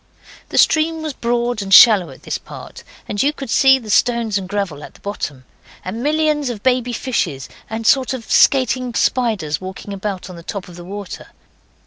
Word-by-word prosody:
The - - -4
stream 315 0 +3
was 310 -2 -4
broad 240 -2 -1
and 195 -1 -6
shallow 200 -3 +8
at - - -14
this - - -3
part, - - -11 0.2
and 205 - -2
you 285 - +2
could 275 -5 -8
see 265 0 +5
the 225 -5 -7
stones 235 -2 +2
and 185 -1 -8
gravel 195 -8 -3
at - - -12
the - - -18
bottom, 145 -10 -6 0.4
and 215 +6 -5
millions 300 -1 +1
of 220 -4 -6
baby 250 -1 +1
fishes, 180 - -2 0.2
and 225 +1 -5
a - - +1
sort 265 0 +3
of 235 -3 -9
skating 255 -2 +2
spiders 210 - 0
walking 190 +2 -7
about 195 -1 -5
on 180 -2 -10
the - - -10
top 190 +2 -6
of 175 - -12
the 175 - -10
water. 200 +1 -8
225 Hz, 195 wpm, -18 LUFS, 190-255 Hz, 0.4 s, shallow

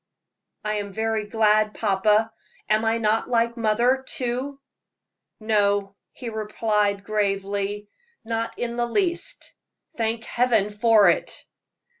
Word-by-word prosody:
"I 210 0 0
am 205 -1 -4
very 220 0 -1
glad, 215 -1 +2
papa; 210 +2 +2 0.3
am 215 +1 +2
I 225 +1 +2
not 220 0 +1
like 235 -1 +1
mother, 240 +3 +2
too?" 255 +3 -2 0.8
"No," 205 -2 +1 0.2
he 245 - -9
replied, 210 -2 -1
gravely, 200 0 -2 0.4
"not 225 0 -3
in 235 0 -3
the 240 0 0
least. 350 - -2 0.4
Thank 225 0 -1
Heaven 235 -4 +1
for 215 -1 +4
it!" - - -4
220 Hz, 115 wpm, -24 LUFS, 210-230 Hz, 0.8 s, for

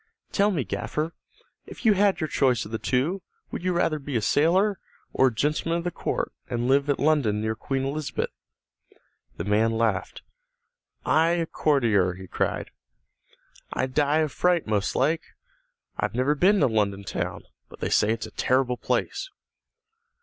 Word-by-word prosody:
"Tell 200 0 +3
me, 165 -10 0
gaffer, 150 - -3 0.5
if - - -11
you 220 - +7
had 200 0 +3
your 155 - 0
choice 130 -6 +1
of 105 - -10
the 110 - -2
two, 150 +10 0 0.3
would - - -4
you 185 - +1
rather 165 -3 +1
be 140 -1 -6
a 115 - +2
sailor, 180 - +3 0.3
or 130 - +4
a - - +1
gentleman 150 +7 0
of 170 - -3
the 175 - -2
court, - - -2 0.2
and 120 0 -1
live 140 +2 +3
at 145 - +2
London, 140 -9 +2
near 110 +1 -1
Queen 135 +4 -3
Elizabeth?" 145 +2 -3 1.1
The - - -3
man 110 +3 +2
laughed. 110 -4 -1 0.8
"I 160 +1 +4
a 170 -1 0
courtier!" 115 - +2
he 95 +1 -9
cried. - - -2 1.0
"I'd 130 0 -2
die 150 +2 +3
of 155 -2 0
fright 180 -2 +2
most 105 -2 0
like. 155 +5 +2 0.8
I've - - -1
never 130 +4 +2
been 190 +7 +3
to - - +5
London 100 -3 0
town, - - -4 0.3
but - - -14
they - - -2
say 105 - +3
it's 115 -1 -2
a - - -10
terrible 130 -1 +1
place!" - - -2
135 Hz, 170 wpm, -26 LUFS, 110-165 Hz, 1.1 s, you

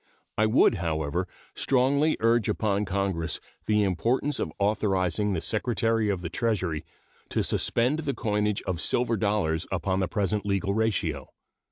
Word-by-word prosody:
I 110 - +3
would, 110 +2 +5
however, 80 +2 -1 0.3
strongly 140 +4 +2
urge 115 0 +3
upon 105 -1 0
Congress 95 -4 -1 0.3
the 105 -1 +3
importance 120 +10 0
of - - -2
authorizing 100 -1 +1
the 85 - -1
Secretary 115 0 +1
of 95 -3 -1
the 85 - -4
Treasury 95 -10 -1 0.5
to - - 0
suspend 125 +6 +1
the 145 -4 -2
coinage 105 -1 0
of 90 -3 -3
silver 120 +6 +1
dollars 100 -6 0
upon 95 +1 0
the 95 - +1
present 105 +1 -1
legal 100 -1 0
ratio. 90 -11 -1
105 Hz, 145 wpm, -27 LUFS, 90-115 Hz, 0.5 s, would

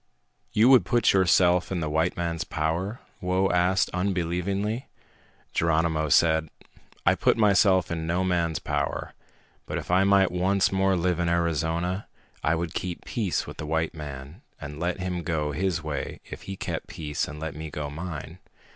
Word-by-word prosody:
"You 110 - +4
would 130 -2 +7
put 120 -1 +3
yourself 90 -1 +4
in 95 - -1
the 80 - -2
white 80 +3 0
man's 85 -1 -2
power?" 85 - -2 0.2
Whoa 95 +1 +1
asked 90 +1 +2
unbelievingly. 95 +5 -1 0.7
Geronimo 80 -1 +1
said, 80 +1 +4 0.6
"I - - +6
put - - +2
myself 100 -5 +4
in 80 -1 -3
no 90 +2 +1
man's 85 -3 +1
power. 75 -1 -2 0.5
But - - -3
if - - -5
I 90 +2 +5
might 100 -1 +4
once 95 +2 +2
more 95 0 +2
live 90 0 0
in 85 -1 +1
Arizona, 85 +2 0 0.4
I 80 - +2
would 85 0 -3
keep 90 -2 -4
peace 105 -7 -1
with - - -9
the 75 - -5
white 80 +1 0
man 75 - -8 0.2
and 75 0 -7
let 90 +2 -1
him 90 -1 -2
go 80 -3 -1
his 85 +1 -1
way 75 -2 -4
if - - -9
he 95 - -3
kept - - -4
peace 75 -2 -3
and 75 +1 -8
let 80 -1 -4
me 80 +1 -6
go 75 0 -4
mine." 80 +1 -6
85 Hz, 170 wpm, -26 LUFS, 80-95 Hz, 0.7 s, would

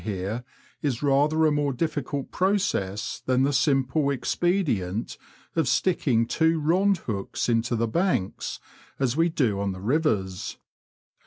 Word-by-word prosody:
here 105 +3 -3 0.4
is 140 -3 -1
rather 145 +3 +3
a 155 - +4
more 145 -1 +1
diflBcult 140 0 -3
process 180 - 0
than 130 0 +3
the 140 +1 +1
simple 135 +1 +2
expedient 125 - 0 0.4
of 160 -5 +1
sticking 130 -9 +2
two 160 +6 +2
rond 185 +6 +3
hooks 100 -4 -3
into 120 +1 +1
the 115 +1 0
banks, 170 - -1 0.4
as 130 -2 0
we 165 +2 +3
do 120 -11 0
on 100 -1 -1
the 95 - -8
rivers. 105 - -1
135 Hz, 135 wpm, -26 LUFS, 115-160 Hz, 0.4 s, a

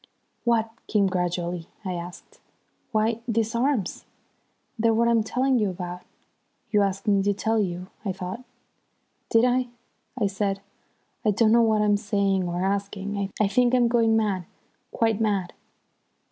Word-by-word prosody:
"What 225 -1 +2 0.2
came 210 -2 +3
gradually?" 180 -2 -2 0.2
I 185 - -2
asked. 175 0 -8 0.5
"Why, 220 0 +1
these 225 0 0
arms! 235 -4 0 0.7
They're 225 0 +3
what 235 +1 +3
I'm 230 -1 +4
telling 255 +3 +1
you 210 -2 +1
about. 180 -1 -6 0.7
You 210 -2 +4
asked 195 +1 -1
me 200 -1 +4
to 200 +1 +1
tell 220 +3 +1
you, 180 -3 -2 0.2
I 200 - -1
thought?" 185 +6 -6 0.9
"Did 230 +1 +4
I?" 250 0 +2 0.5
I 210 - +2
said. 195 0 -1 0.6
"I 215 - +3
don't 215 +2 +3
know 235 +1 +6
what 220 -2 +3
I'm 205 -1 +3
saying 200 -3 0
or 175 +2 -1
asking. 200 0 -2
I 210 - +4
think 245 +4 +3
I'm 245 -1 +4
going 230 -2 +3
mad, 200 -5 0 0.5
quite 225 -1 +1
mad." 200 -5 0
210 Hz, 150 wpm, -25 LUFS, 195-230 Hz, 0.9 s, know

